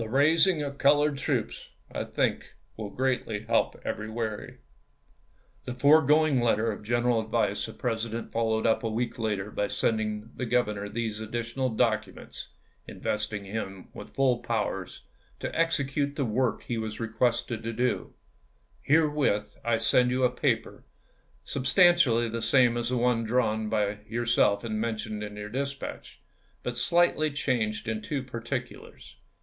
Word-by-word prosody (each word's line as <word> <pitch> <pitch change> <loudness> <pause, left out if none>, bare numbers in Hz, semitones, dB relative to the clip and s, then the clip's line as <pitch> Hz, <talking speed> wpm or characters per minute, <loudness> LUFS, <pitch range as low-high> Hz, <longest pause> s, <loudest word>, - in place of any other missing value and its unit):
raising 155 - +4
of 140 -1 -6
colored 145 +1 +4
troops, 135 - -2 0.2
I - - -3
think, - - -1 0.2
will 110 -2 -5
greatly 125 -4 -1
help - - 0
every 110 0 -3
way. 110 -2 -4 1.1
The 125 - -5
foregoing 150 0 +5
letter 115 -1 +2
of 105 - -7
general 120 +2 +1
advice 110 -2 0
the 110 - -8
Presi 115 -2 -2
dent 115 +1 -5
followed 110 -1 0
up 115 - +3
a 115 - -2
week 115 +2 -2
later 105 -2 -2
by 105 - -1
sending 110 +1 -1
the 125 - -4
Grov 125 +1 +3
ernor 100 -1 -5
these 110 -1 -3
additional 120 +4 -2
documents, 110 -4 -2 0.4
investing 105 -1 -3
him 95 -2 -6
with - - -11
full 130 -3 +3
powers 105 -6 -3 0.4
to - - -4
execute 145 -3 0
the 140 - 0
work 120 +2 0
he 120 -2 -3
was 110 -1 -5
re 115 - -2
quested 115 0 0
to 115 - -3
do: 125 +2 -1 0.3
" 65 +1 -37
Herewith 150 -8 +2
I 115 -1 +2
send 125 +2 +3
you 130 +1 0
a 125 - +4
paper, - - -1 0.6
substantially 140 - +4
the 115 +1 -4
same 125 -1 +4
as 120 0 -1
the 125 - 0
one 120 -1 +2
drawn 110 -2 0
by 105 -1 0
your 120 +2 -2
self 105 -3 +3
and 110 -2 -2
mentioned 110 -2 -3
in 105 -1 -6
your 105 0 -6
dispatch, 140 +3 -5 0.4
but 125 - -3
slightly 170 +3 +3
changed 115 -7 -1
in 110 -1 -2
two 135 +4 -3
particulars. 125 0 -6
115 Hz, 155 wpm, -28 LUFS, 110-130 Hz, 1.1 s, foregoing